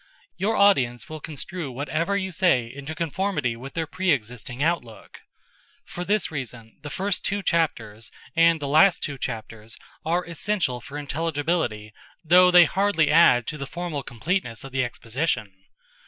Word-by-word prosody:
Your 215 +4 0
audience 130 - +3
will 155 0 -6
construe 160 +1 -6
whatever 155 +9 -1
you 190 -1 -3
say 160 -8 +2
into 140 +6 -8
conformity 165 -6 -1
with 135 +4 -10
their 165 -1 -1
pre 185 +4 -2
existing 125 -1 -1
outlook. 150 -10 -3 0.6
For 175 - -6
this 205 0 0
reason 125 -6 -7
the 145 - -7
first 195 +5 -2
two 205 0 -2
chapters 115 - -1 0.3
and 165 0 +5
the 145 - -4
last 155 +7 +5
two 140 -2 -4
chapters 115 -2 -6 0.3
are 175 +3 0
essential 170 -7 -2
for 140 +4 -8
intelligibility 145 -7 -2 0.3
though 180 +3 +7
they 175 -1 +8
hardly 195 -4 +2
add 150 -7 +6
to 150 - -5
the 140 - -5
formal 170 -2 -4
completeness 120 - -3
of 135 - -9
the 130 0 0
exposition. 120 -2 -2
150 Hz, 155 wpm, -24 LUFS, 125-175 Hz, 0.6 s, they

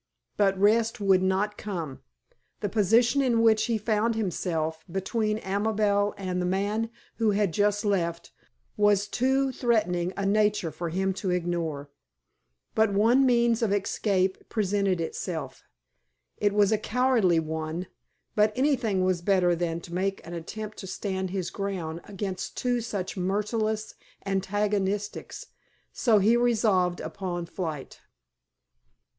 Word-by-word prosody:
But 195 -2 +2
rest 220 +3 +3
would 195 -2 +4
not 195 +3 0
come. 165 -10 -5 0.6
The 205 - -1
position 230 +6 +3
in 235 -4 +2
which 220 -1 +4
he 230 -2 0
found 220 +1 0
himself, 165 -6 -2
between 210 +3 -1
Amabel 205 +1 +1
and 185 -2 -2
the - - -1
man 205 +4 0 0.3
who 225 -2 +2
had 200 -4 +1
just 205 +2 +1
left, 170 -4 -1 0.4
was 205 -1 +3
of 205 - -18
too 265 +2 +2
threatening 185 -9 +1
a 200 - -1
nature 210 -4 +2
for 170 +1 -4
him 190 +3 0
to 190 - -1
ignore. 165 -5 -2 0.8
But 220 -1 +3
one 235 +7 +4
means 235 -1 +3
of 225 -4 +1
escape 195 -1 0
presented 200 -3 0
itself. 165 0 -5 0.7
It 205 -1 +2
was 205 0 +4
a 215 - +2
cowardly 225 -7 +2
one; 160 +2 -3 0.5
but 210 0 +4
anything 250 -9 +1
was 185 -2 +1
better 180 -2 +3
than 170 -1 -2
to 170 - -10
make 195 +2 -2
an 170 - -8
attempt 215 +6 -6
to 190 - -7
stand 190 -1 -3
his 185 -2 -3
ground 175 -5 -4
against 195 -2 -5
two 245 -1 0
such 205 -5 -4
merciless 210 +3 -1 0.3
antagonists; 205 +1 -2 0.5
so 225 -4 +3
he 210 +4 +4
resolved 215 -7 +2
upon 180 -3 -4
flight. 160 -5 -6
200 Hz, 135 wpm, -27 LUFS, 180-215 Hz, 0.8 s, would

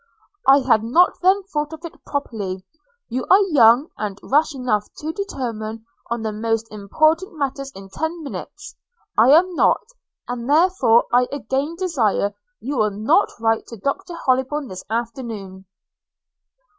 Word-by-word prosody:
'I 275 +1 +7
had 230 -4 +3
not 335 +11 +3
then 380 +2 +3
thought 300 -5 -3
of 320 +2 -9
it 335 - -11
properly. 200 -9 -4 0.4
You 250 +2 -3
are 380 - +7
young, 245 +1 +5
and 205 -2 -4
rash 295 +2 +2
enough 225 -5 -1
to 315 +1 -5
determine 225 - -5 0.2
on 235 -1 -2
the 220 - -2
most 225 +1 -1
important 310 - 0
matters 275 -1 -3
in 195 0 -10
ten 320 - -4
minutes 395 +7 -8 0.2
– - - -39
I 230 +3 +6
am 350 +6 +5
not; - - +2 0.4
and 245 +1 -5
therefore 295 -8 +4
I 245 0 +4
again 280 +4 -2
desire 250 - 0 0.3
you 275 +3 -4
will 215 -2 +3
not 210 +2 +2
write 225 0 0
to 230 - -9
Dr 340 - -3
Hollybourn 260 +2 0
this 185 0 -8
afternoon.' 225 -5 -5
255 Hz, 150 wpm, -21 LUFS, 220-310 Hz, 0.4 s, I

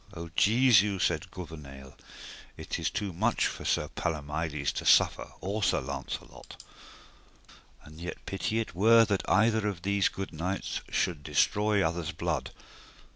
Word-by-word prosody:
O 85 0 -7
Jesu, 105 -3 +4
said 85 -1 0
Gouvernail, 75 -7 -10 0.6
it - - -4
is - - 0
too 100 -3 -3
much 110 +7 +1
for - - -4
Sir - - +1
Palomides 75 -1 -2
to - - -5
suffer - - +4
or 100 +4 -3
Sir 105 - +2
Launcelot, - - -7 1.2
and 75 +2 -13
yet 85 - -7
pity 110 +3 -2
it 115 - -4
were 115 +5 +6
that 100 -3 -1
either 110 0 +3
of 95 -4 -4
these 100 0 +2
good 95 -2 -6
knights 90 +5 -3
should 85 -5 -1
destroy 105 +6 +2
other's 85 0 -4
blood. 80 -2 -2
90 Hz, 140 wpm, -29 LUFS, 80-105 Hz, 1.2 s, were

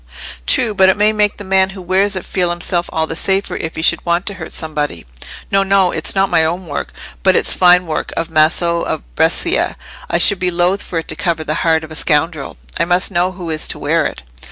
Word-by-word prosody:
"True: 220 - +2
but 190 -1 +4
it 190 - +2
may 210 +1 +3
make 210 -1 +1
the 205 - -8
man 190 0 +2
who - - -7
wears 190 +3 +1
it 185 - -5
feel 180 -2 -1
himself 175 0 +1
all 160 0 0
the 160 - -6
safer 195 +3 0
if 160 - -5
he 160 - -4
should - - +2
want 170 +1 0
to 200 - -1
hurt 180 -4 -9
somebody. 150 - -2 0.5
No, 195 0 +3
no; 195 -2 +2
it's 160 - +1
not 195 0 +2
my 160 - +2
own 175 +3 -2
work; 145 -3 -5 0.3
but - - +3
it's - - +2
fine 180 0 +4
work 160 -2 -3
of 165 0 -3
Maso 170 +2 +2
of - - -3
Brescia; - - +1 0.3
I - - +1
should 185 +2 +4
be 180 - +1
loth 180 +3 0
for 175 - -5
it 165 - -3
to - - -1
cover 170 -5 -1
the 155 - -2
heart 160 -1 +2
of 155 - -10
a - - -7
scoundrel. 150 - -1 0.2
I - - +2
must 180 +3 +2
know 180 +1 0
who 175 -3 -6
is 155 0 -1
to - - -4
wear - - +1
it." - - -9
175 Hz, 240 wpm, -16 LUFS, 160-190 Hz, 0.5 s, but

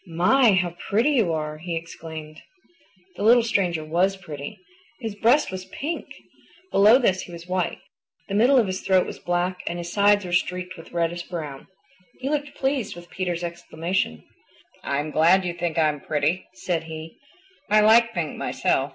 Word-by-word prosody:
"My, 200 +8 +4
how 175 -2 0
pretty 230 +9 +3
you 225 - +2
are!" 155 -1 -3
he 170 +1 -4
exclaimed. 160 -2 -8 0.8
The - - -6
little 235 +3 +6
stranger 180 -8 0
WAS 180 +5 +1
pretty. 150 -6 -8 0.4
His 225 -4 -4
breast 235 +7 +3
was 185 0 -6
PINK. 320 - -5 0.6
Below 210 +5 +7
this 190 -8 +1
he - - -10
was 170 0 -9
white. 185 0 -1 0.5
The 195 - -5
middle 245 +7 +5
of 240 - +5
his 185 -1 -3
throat 190 -1 +3
was - - -7
black 175 +1 -1
and 175 - -2
his 175 0 -6
sides 205 -1 +4
were 175 - -5
streaked 180 +1 -1
with 165 -2 -13
reddish 170 0 -2
brown. 150 -6 -6 0.5
He 265 +2 -2
looked 290 -1 -2
pleased 265 -8 -1
at 175 0 -13
Peter's 175 -2 -3
exclamation. 170 - -3 0.6
"I'm 145 +2 -2
glad 175 +5 +4
you 175 - -2
think 170 -1 -3
I'm 155 -2 +2
pretty," 155 +4 -1
said 175 -3 -2
he. 160 0 -9 0.5
"I 215 +1 +5
like 230 +2 +6
pink 170 -8 -3
myself. - - 0
180 Hz, 170 wpm, -24 LUFS, 165-205 Hz, 0.8 s, Below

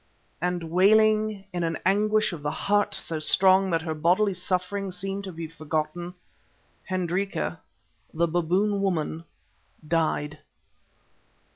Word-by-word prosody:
And 175 -2 -2
wailing 215 +2 +3
in 175 -1 -1
an 165 -1 -1
anguish 210 +1 +2
of 160 - -7
the 145 - -1
heart 205 +6 +1
so 160 -2 -3
strong 190 +4 +4
that 165 -2 0
her 160 -1 -2
bodily 180 +6 +2
suffering 185 +2 -2
seemed 195 +2 -4
to 190 - -6
be 165 -1 -6
forgotten, 155 +2 -4 0.7
Hendrika, 185 +1 -2 0.5
the 170 +1 +1
Baboon 180 +5 +1
woman, 165 -3 -1 0.6
died. 150 -2 0
180 Hz, 120 wpm, -26 LUFS, 165-195 Hz, 0.7 s, strong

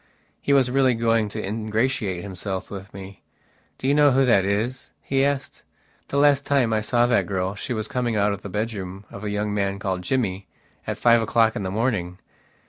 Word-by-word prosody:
He - - -1
was 135 -3 +4
really 130 -2 +3
going 115 -2 +1
to - - -5
ingratiate 110 -2 -1
himself 95 -1 -5
with 100 0 -8
me. 95 0 -10 0.6
"Do 130 - -3
you 140 - +4
know 145 0 +5
who 135 0 +3
that 100 -6 +4
is?" 110 +6 -2
he 135 0 0
asked. 140 +1 -2 0.5
"The 140 - -2
last 145 -1 +4
time 135 -6 +2
I 110 - +1
saw 120 +3 +2
that 120 0 +2
girl 95 -1 -1
she 105 - -6
was 110 -2 -2
coming 120 -2 -1
out 105 0 +2
of 100 - -7
the 100 - -7
bedroom 100 -2 -4
of 100 - -9
a 105 - -2
young 105 0 -2
man 100 -1 -1
called 95 -2 -2
Jimmy 100 -3 -1 0.4
at - - -2
five 120 -1 +4
o'clock 115 0 +2
in - - -3
the 95 - -3
morning. 100 -5 -1
110 Hz, 205 wpm, -23 LUFS, 100-125 Hz, 0.6 s, know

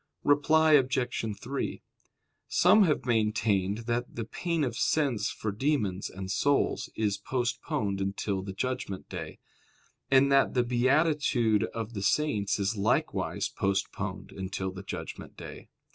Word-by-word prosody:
Reply 155 +2 +4
Obj. 125 -6 +1
3: 135 +3 -4 0.7
Some 200 +4 +5
have 150 -6 0
maintained 105 -4 +1
that 120 +1 -2
the 115 - -3
pain 165 +6 -2
of 120 -4 -2
sense 135 -3 +1
for 110 - -3
demons 105 -5 -1
and 95 0 -6
souls 140 +9 +1
is 105 -2 0
postponed 120 -4 -2
until 100 0 -2
the 95 +1 -6
judgment 100 -2 -4
day: - - -6 0.7
and 135 +1 +5
that 135 -1 +4
the 125 - +4
beatitude 125 -3 +2
of 115 0 -6
the 100 - -4
saints 105 -1 +1
is 100 +2 0
likewise 100 - 0
postponed 100 0 -2
until 95 0 -4
the 95 0 -8
judgment 95 - -7
day. - - -10
115 Hz, 130 wpm, -29 LUFS, 100-140 Hz, 0.7 s, Some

